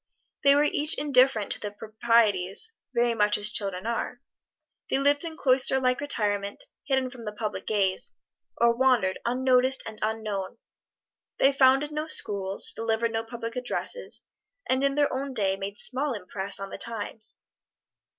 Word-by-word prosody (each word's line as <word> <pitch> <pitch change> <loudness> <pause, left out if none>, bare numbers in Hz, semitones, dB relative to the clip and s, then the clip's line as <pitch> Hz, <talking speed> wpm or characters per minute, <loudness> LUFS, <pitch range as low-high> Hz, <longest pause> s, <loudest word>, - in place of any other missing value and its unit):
They 280 0 +6
were 290 - +4
each 300 +1 0
indifferent 260 -6 +3
to - - +3
the 210 - -4
proprieties, 215 - +1 0.2
very 240 -1 +1
much 210 -2 +3
as 210 0 +1
children 195 -4 -1
are. 235 +1 -3 0.7
They - - +1
lived 285 +2 +2
in 325 -1 -5
cloister 265 -1 +3
like 255 0 +1
retirement, 205 - -1 0.2
hidden 265 -2 0
from 240 -3 -11
the 210 - -3
public 210 0 -4
gaze, 195 -3 0 0.5
or 235 0 +3
wandered 240 -7 +2
unnoticed 255 +1 +2
and 220 -1 -8
unknown. 215 -3 -3 0.8
They 270 - +4
founded 270 +2 +4
no 305 +1 -3
schools, 200 -9 0
delivered 225 +1 -1
no 225 0 -2
public 230 0 -7
addresses, 250 - -1 0.5
and 260 +1 +1
in 275 0 +1
their 290 -1 +2
own 270 0 -4
day 195 -4 +1
made 195 +1 -6
small 270 +2 +1
impress 195 0 -1
on 195 0 -6
the - - -6
times. 225 -1 -2
235 Hz, 155 wpm, -26 LUFS, 210-265 Hz, 0.8 s, They